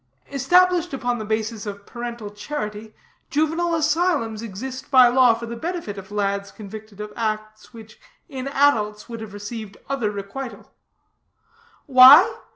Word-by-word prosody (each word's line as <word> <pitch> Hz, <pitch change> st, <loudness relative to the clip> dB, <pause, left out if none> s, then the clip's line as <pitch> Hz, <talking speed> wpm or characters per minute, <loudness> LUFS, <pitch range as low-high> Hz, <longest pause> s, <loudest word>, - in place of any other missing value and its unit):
Established 350 Hz, +4 st, +3 dB
upon 245 Hz, -2 st, -2 dB
the 215 Hz, -, -5 dB
basis 220 Hz, 0 st, -3 dB
of 200 Hz, 0 st, -7 dB
parental 235 Hz, -3 st, -7 dB
charity, 210 Hz, -2 st, -6 dB, 0.3 s
juvenile 325 Hz, +3 st, 0 dB
asylums 305 Hz, -8 st, 0 dB
exist 255 Hz, +5 st, -7 dB
by 255 Hz, -2 st, +7 dB
law 250 Hz, -2 st, +5 dB
for 235 Hz, +1 st, -7 dB
the 235 Hz, 0 st, -6 dB
benefit 330 Hz, -, -5 dB
of 190 Hz, +1 st, -12 dB
lads 200 Hz, -1 st, -2 dB
convicted 215 Hz, 0 st, -11 dB
of 210 Hz, 0 st, -7 dB
acts 215 Hz, -1 st, -4 dB
which, 220 Hz, -2 st, -14 dB, 0.3 s
in 270 Hz, -4 st, -6 dB
adults, 225 Hz, -7 st, +1 dB
would 230 Hz, -1 st, -7 dB
have 220 Hz, -2 st, -8 dB
received 205 Hz, 0 st, -7 dB
other 255 Hz, -6 st, 0 dB
requital. 210 Hz, +6 st, -8 dB, 1.1 s
Why? 285 Hz, -, +8 dB
230 Hz, 140 wpm, -22 LUFS, 210-275 Hz, 1.1 s, Why